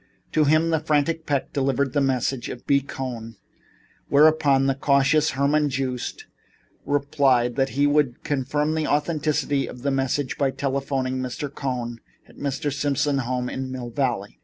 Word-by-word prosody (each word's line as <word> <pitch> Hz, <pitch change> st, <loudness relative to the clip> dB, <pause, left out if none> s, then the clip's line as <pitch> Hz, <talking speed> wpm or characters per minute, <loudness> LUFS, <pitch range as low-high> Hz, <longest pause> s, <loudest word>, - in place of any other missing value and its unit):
To 155 Hz, -, +3 dB
him 155 Hz, +3 st, +3 dB
the 160 Hz, -, +2 dB
frantic 155 Hz, +2 st, 0 dB
Peck 140 Hz, -2 st, -1 dB
delivered 135 Hz, -1 st, 0 dB
the 145 Hz, -, +2 dB
message 130 Hz, -1 st, 0 dB
of 120 Hz, -, -8 dB
B. 140 Hz, -, +4 dB
Cohn, 125 Hz, -4 st, -6 dB, 0.7 s
whereupon 145 Hz, -2 st, +4 dB
the 135 Hz, -, +2 dB
cautious 140 Hz, +3 st, +3 dB
Herman 145 Hz, +2 st, +2 dB
Joost 130 Hz, -2 st, -3 dB, 0.6 s
replied 135 Hz, -4 st, +2 dB
that 135 Hz, 0 st, -1 dB
he 145 Hz, -, +4 dB
would 145 Hz, -4 st, +1 dB
confirm 145 Hz, +1 st, 0 dB
the 160 Hz, -1 st, -1 dB
authenticity 150 Hz, -2 st, 0 dB
of 125 Hz, -, -10 dB
the 140 Hz, -, +1 dB
message 135 Hz, 0 st, -1 dB
by 140 Hz, -2 st, +3 dB
telephoning 135 Hz, -1 st, -2 dB
to 130 Hz, -, -2 dB
Mr. 140 Hz, +3 st, -5 dB
Cohn 125 Hz, -4 st, -4 dB, 0.3 s
at -, -, -18 dB
Mr. 140 Hz, 0 st, -2 dB
Simon's 140 Hz, -2 st, 0 dB
home 125 Hz, 0 st, -2 dB
in 130 Hz, +1 st, -4 dB
Mill 125 Hz, -2 st, -6 dB
Valley. 120 Hz, -6 st, -2 dB
140 Hz, 160 wpm, -24 LUFS, 130-145 Hz, 0.7 s, B